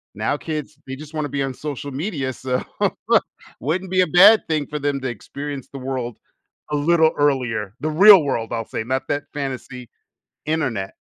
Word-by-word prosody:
Now 110 +7 0
kids, 155 -2 -5
they 135 - -6
just 155 +1 -11
wanna 155 -2 -2
be 140 +1 -2
on 135 -1 -3
social 145 0 -6
media, 140 -3 -3
so 125 +1 -2 1.0
wouldn't 180 +7 -2
be 185 0 +4
a 180 - +2
bad 205 +5 +7
thing 150 -3 0
for 150 - -4
them 145 -1 -1
to 130 - -2
experience 140 +2 -7
the 140 - -7
world 130 -3 -4 0.5
a - - +1
little 160 +1 +4
earlier. 120 -8 0
The 155 - -1
real 195 +3 +9
world, 115 -5 -2
I'll 115 -1 -2
say, - - -4
not 130 +3 -2
that 145 0 -1
fantasy 130 -4 -5 0.6
internet. 135 -11 -1
140 Hz, 180 wpm, -21 LUFS, 130-155 Hz, 1.0 s, real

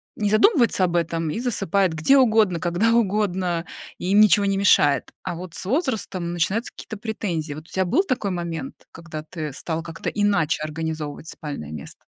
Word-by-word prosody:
не 210 -1 0
задумывается 235 - +4
об 175 -1 -2
этом 165 -1 0
и - - -3
засыпает 200 -7 +1
где 165 - +4
угодно, 220 -8 +4
когда 185 +7 +2
угодно. 190 -6 +1 0.3
И 180 - -3
им 205 +2 +6
ничего 205 0 +5
не 195 0 +1
мешает. 145 -8 +3
А - - -3
вот 175 0 -7
с - - -5
возрастом 215 - -1
начинаются 190 +8 -1
какие-то 220 - -9
претензии. 185 -8 -3
Вот 155 - -9
у - - -20
тя 190 - +1
был 275 - +2
такой 250 - -1
момент, 170 -5 -4 0.2
когда 165 -2 -8
ты 155 -1 -6
стала 160 +3 -3
как-то 165 0 -5
иначе 200 -8 +1
организовывать 155 -1 -5
спальное 140 - -7
место? 75 -3 -10
180 Hz, 175 wpm, -23 LUFS, 160-210 Hz, 0.3 s, им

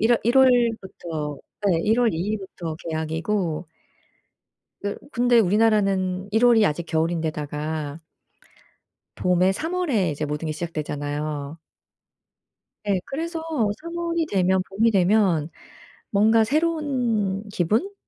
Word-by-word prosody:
1 225 +2 +4
월 235 - +2
1 235 - +2
월부터 195 - +1 0.3
예. 165 - +2
1 220 +5 +2
월 235 -2 +3
2 - - -3
일부터 185 -4 -4
개학이고 160 +2 -2 1.2
또 205 0 -2 0.2
근데 245 -1 +4
우리나라는 195 -2 +2
1 220 +3 +3
월이 235 -3 +6
아직 160 +3 -2
겨울인 165 +1 0
데다가 150 0 -4 1.2
봄에 180 +1 +2
3 320 - -4
월에 245 - +1
이제 150 +1 -3
모든 150 +2 -3
게 155 - -1
시작되잖아요. 150 -2 -4 1.3
예. 195 -2 +2
그래서 330 +4 -4 0.4
3 335 +1 -7
월이 335 -1 -1
되면 190 -4 +2
봄이 215 +4 +2
되면 185 -5 +3 0.6
뭔가 220 +2 +4
새로운 250 - 0
기분? 215 - 0
195 Hz, 215 characters per minute, -24 LUFS, 160-230 Hz, 1.3 s, 월이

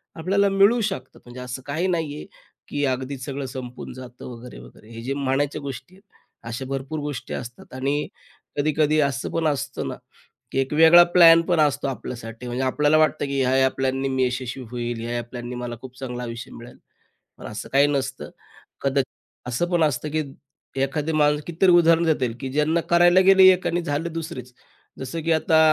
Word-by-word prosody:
आपल्याला 195 +4 +1
मिळू 200 +5 +4
शकतात. 190 -12 -4
म्हणजे 120 +1 -10
असं 125 +1 -6
काही 160 +6 -1
नाही 160 -5 -1
आहे - - -8 0.4
की 145 - -3
अगदी 130 +1 -2
सगळं 135 +2 -5
संपून 125 -2 -7
जातं 125 -1 -11
वगैरे-वगैरे 110 - -12
हे 115 - -8
जे 135 +3 -2
म्हणायच्या 140 +2 -1
गोष्टी 135 +4 -8
आहेत. 195 - -21 0.5
अशा 125 +3 -5
भरपूर 135 +3 -4
गोष्टी 145 -4 -5
असतात 120 +2 -8
आणि 140 +3 -1 0.5
कधी-कधी 155 +1 +2
असं 135 -3 -4
पण 165 -1 0
असतं 145 -2 -2
ना - - -4 0.6
की - - -1
एक 135 +2 -1
वेगळा 165 +3 +8
प्लॅन 165 -2 +8
पण 175 -2 +1
असतो 145 -2 +2
आपल्यासाठी 120 -2 -6
म्हणजे 125 +2 -2
आपल्याला 150 +4 +2
वाटतं 155 -2 +2
की 140 0 -2
ह्या-ह्या 130 +1 +3
प्लॅननी 135 0 0
मी 130 -1 +1
यशस्वी 125 +1 -4
होईल 120 -1 -3
ह्या-ह्या 120 +1 -3
प्लॅननी 120 0 -6
मला 120 -1 -5
खूप 130 -1 -11
चांगला 125 -2 -5
आयुष्य 115 0 -7
मिळेल. 120 +1 -12 0.6
पण - - -11
असं 110 0 -7
काही 140 +1 +5
नसतं. 135 -2 -3 0.5
कदा 140 0 +2 0.5
असं 125 +8 0
पण 170 -2 +3
असतं 150 -1 0
की 155 0 0 0.6
एखादी 145 +3 -1
माणूस 150 -1 +3
कितीतरी 175 +2 +3
उदाहरण 170 -1 +5
देतील 130 -7 +1
की 135 -1 -4
ज्यांना 150 +4 +1
करायला 175 +1 +6
गेले 195 0 +7
एक 185 - -5
आणि 175 +1 0
झालं 165 +1 -2
दुसरीच 160 -7 -6 0.5
जसं 130 +5 -5
की 165 - 0
आता 160 0 +3
140 Hz, 180 wpm, -23 LUFS, 125-160 Hz, 0.6 s, वेगळा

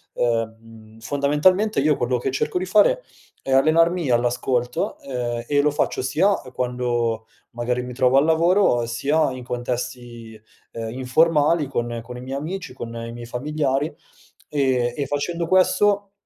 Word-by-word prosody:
ehm, 115 -1 -3
fondamentalmente 150 - +2
io 150 +1 +3
quello 125 0 0
che 135 - -2
cerco 135 - -1
di 185 - -1
fare 215 - +3 0.4
è 135 - -5
allenarmi 165 +2 +3
all'ascolto, 120 +1 0
ehm, 120 -3 -4
e 145 -1 +3
lo 150 0 +2
faccio 145 - -1
sia, 155 +9 +2
ehm, 130 - -12
quando 120 -3 -1 0.3
magari 125 +1 -2
mi 125 0 -7
trovo 130 +1 +3
al 140 - +5
lavoro, 165 - +3
sia 140 +5 +1
in 130 -1 -7
contesti, 120 -2 -5 0.3
ehm, 115 -1 -5
informali 150 +4 +2
con 120 -3 -3
con 125 +1 -9
i - - -8
miei 135 +2 -5
amici, 165 0 -5
con 120 -2 -7
i 115 0 -6
miei 120 0 -8
familiari. 145 +3 -1 0.6
Ehm, 130 -4 +1
e 140 - -2
facendo 165 +4 -2
questo, 195 +2 +3
130 Hz, 150 wpm, -22 LUFS, 120-155 Hz, 0.6 s, al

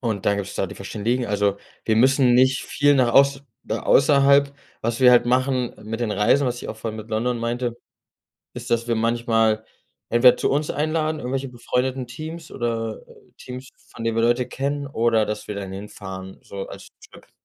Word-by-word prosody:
Und 110 -5 -2
dann 100 -1 +2
gibt 100 -1 -4
es - - -9
da - - -1
die - - -9
Verständigen. 115 +5 -2
Also, 100 -1 +1 0.3
wir 110 - +1
müssen 130 +1 +4
nicht 130 +1 +3
viel 145 0 +2
nach 125 -4 +3
auß 140 0 +4 0.2
da 110 - -3
außerhalb. 140 0 +4 0.3
Was 115 +2 -2
wir 125 -1 +7
halt 120 -1 +5
machen 130 0 +1
mit 115 +2 -5
den 110 -3 -1
Reisen, 115 +7 +3
was 125 -1 -3
ich - - -7
auch - - -5
vorhin 110 -1 -5
mit 110 +1 -9
London 120 +3 -1
meinte, 120 +1 -2 0.8
ist, 120 0 -8
dass 115 0 +1
wir 120 - +1
manchmal 115 -1 +1 0.5
entweder 125 +1 +6
zu - - 0
uns 145 +2 0
einladen, 155 +1 -1
irgendwelche 135 +1 -3
befreundeten 125 +1 -2
Teams, 155 +6 -8
oder, 115 -2 -3
äh, - - -19
Teams, 130 +1 -9 0.2
von 115 - -9
denen 115 0 -1
wir 115 - +2
Leute 120 +1 +2
kennen, 140 +1 -3
oder 115 -4 +1
dass 105 0 -5
wir 105 - -4
dann 100 -2 -6
hinfahren, 95 -1 -8
so 100 -1 -7
als - - -11 0.2
Trip. - - -17
120 Hz, 195 wpm, -23 LUFS, 110-130 Hz, 0.8 s, wir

